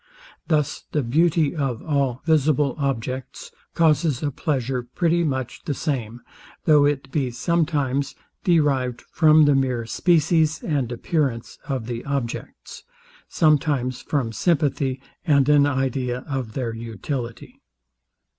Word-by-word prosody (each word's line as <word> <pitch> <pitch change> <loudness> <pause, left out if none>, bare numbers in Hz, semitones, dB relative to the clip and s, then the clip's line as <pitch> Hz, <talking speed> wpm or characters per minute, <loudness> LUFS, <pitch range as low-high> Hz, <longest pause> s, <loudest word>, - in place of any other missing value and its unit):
Thus 150 -4 0
the 150 - +1
beauty 155 +5 +2
of 135 -6 -2
all 140 -4 -1
visible 150 -3 +2
objects 130 -2 -3 0.2
causes 155 -3 +2
a 145 - 0
pleasure 135 -4 -1
pretty 170 +7 0
much 130 -5 -3
the 145 - -2
same, 120 -7 -3 0.4
though 150 -3 +5
it 140 -2 -1
be 135 -4 0
sometimes 140 -1 0 0.3
derived 140 -8 +1
from 155 -2 +5
the 145 - +4
mere 130 -4 0
species 160 +3 +2
and 140 -7 -1
appearance 125 -2 -2
of 130 -6 -2
the 120 0 -5
objects; 135 -4 -5 0.5
sometimes 145 -5 +1
from 135 -6 -1
sympathy, 140 -4 0 0.2
and 140 -5 +3
an 145 -1 +5
idea 130 -2 -1
of 130 -6 -4
their 120 -4 -3
utility. 115 +2 -6
140 Hz, 120 wpm, -23 LUFS, 125-155 Hz, 0.5 s, though